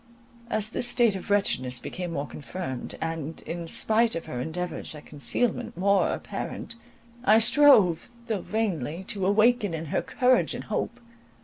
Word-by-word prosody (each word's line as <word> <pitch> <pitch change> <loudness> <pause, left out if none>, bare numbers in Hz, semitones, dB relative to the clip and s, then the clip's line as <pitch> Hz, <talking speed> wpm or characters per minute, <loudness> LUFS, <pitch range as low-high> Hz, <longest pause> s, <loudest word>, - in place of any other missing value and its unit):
As 215 -1 -1
this 240 - -1
state 240 -4 +3
of 190 - -7
wretchedness 130 -11 +1
became 175 +7 -5
more 140 -2 -2
confirmed, 145 -3 -6
and, 165 -1 -4
in 170 0 -5
spite 225 +6 +2
of 165 - -4
her 125 - -5
endeavours 165 +3 -4
at 150 - -11
concealment 235 +10 -2
more 200 +2 +3
apparent, - - -5 0.5
I 215 -2 +6
strove, 225 - +6 0.2
though 220 -5 -2
vainly, 180 - -2
to 195 -2 0
awaken 215 -2 +3
in 160 +1 -5
her - - +2
courage 250 -1 +2
and - - -6
hope. 235 +3 -3
195 Hz, 150 wpm, -26 LUFS, 165-225 Hz, 0.5 s, I